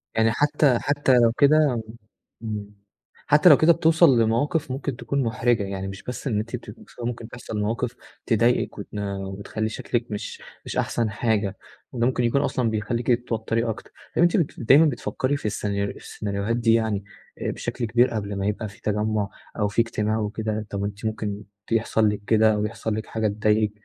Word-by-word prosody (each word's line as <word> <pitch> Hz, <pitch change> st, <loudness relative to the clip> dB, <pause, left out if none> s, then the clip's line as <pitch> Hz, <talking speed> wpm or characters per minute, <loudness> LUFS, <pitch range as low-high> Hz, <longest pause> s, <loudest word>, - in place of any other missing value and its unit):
يعني 110 Hz, 0 st, +3 dB
حتى 145 Hz, 0 st, +3 dB
حتى 145 Hz, -2 st, +2 dB
لو 115 Hz, -1 st, +5 dB
كده 140 Hz, -1 st, +4 dB, 0.6 s
امم، 105 Hz, -2 st, -5 dB, 0.5 s
حتى 150 Hz, +4 st, +6 dB
لو 145 Hz, -, +9 dB
كده 165 Hz, +2 st, +6 dB
بتوصل 160 Hz, -6 st, +5 dB
لمواقف 130 Hz, +7 st, +1 dB
ممكن 135 Hz, 0 st, -3 dB
تكون 135 Hz, +3 st, -1 dB
محرِجة، 115 Hz, -1 st, +1 dB
يعني 95 Hz, -1 st, -4 dB
مش 95 Hz, 0 st, -8 dB
بس 125 Hz, +3 st, -5 dB
إن 110 Hz, -5 st, +1 dB
أنتِ 115 Hz, +3 st, -4 dB
بتبقي 115 Hz, -4 st, -10 dB
مكسوفة، 120 Hz, -, -9 dB
ممكن 120 Hz, -1 st, -4 dB
تحصل 115 Hz, -3 st, -6 dB
مواقف 115 Hz, +3 st, -1 dB, 0.3 s
تضايقِك، 120 Hz, +1 st, +2 dB
وتن 105 Hz, 0 st, -6 dB
وتخلّي 100 Hz, +2 st, -4 dB
شكلِك 120 Hz, +2 st, -3 dB
مش 105 Hz, 0 st, -5 dB, 0.2 s
مش -, -, -5 dB
أحسن 115 Hz, -2 st, 0 dB
حاجة، 105 Hz, -3 st, 0 dB, 0.3 s
وده 120 Hz, -2 st, 0 dB
ممكن 125 Hz, -1 st, 0 dB
يكون 120 Hz, +4 st, +2 dB
أصلًا 130 Hz, -4 st, 0 dB
بيخلِّيكِ 110 Hz, +2 st, -2 dB
تتوتري 115 Hz, -1 st, 0 dB
أكتر. 110 Hz, -, -6 dB, 0.2 s
طب -, -, +2 dB
أنتِ 175 Hz, +3 st, +4 dB
بت 165 Hz, -7 st, -1 dB
دايمًا 140 Hz, +7 st, +6 dB
بتفكّري 135 Hz, 0 st, -1 dB
في -, -, -12 dB
السينا 100 Hz, -1 st, -1 dB
السيناريوهات 100 Hz, +1 st, -3 dB
دي 115 Hz, -1 st, +3 dB
يعني 110 Hz, -3 st, +1 dB, 0.4 s
آآ -, -, -1 dB
بشكل 120 Hz, -, -4 dB
كبير 120 Hz, +3 st, +3 dB
قبل 105 Hz, -2 st, -3 dB
ما 100 Hz, -, -2 dB
يبقى 105 Hz, +1 st, -2 dB
في 100 Hz, -, -17 dB
تجمُّع 105 Hz, -1 st, 0 dB, 0.3 s
أو 105 Hz, -, +2 dB
في 105 Hz, +3 st, +2 dB
اجتماع 110 Hz, -1 st, -1 dB
وكده؟ 110 Hz, 0 st, -3 dB
طب 100 Hz, 0 st, -3 dB
أنتِ 100 Hz, +2 st, -5 dB
ممكن 105 Hz, -1 st, -3 dB, 0.3 s
يحصل 110 Hz, -1 st, +2 dB
لِك 105 Hz, -1 st, -3 dB
كده 110 Hz, -1 st, +5 dB
أو 105 Hz, 0 st, 0 dB
يحصل 105 Hz, +1 st, -3 dB
لِك 110 Hz, -, -4 dB
حاجة 110 Hz, -1 st, -1 dB
تضايقِك، 105 Hz, 0 st, +1 dB
110 Hz, 180 wpm, -24 LUFS, 105-125 Hz, 0.6 s, لو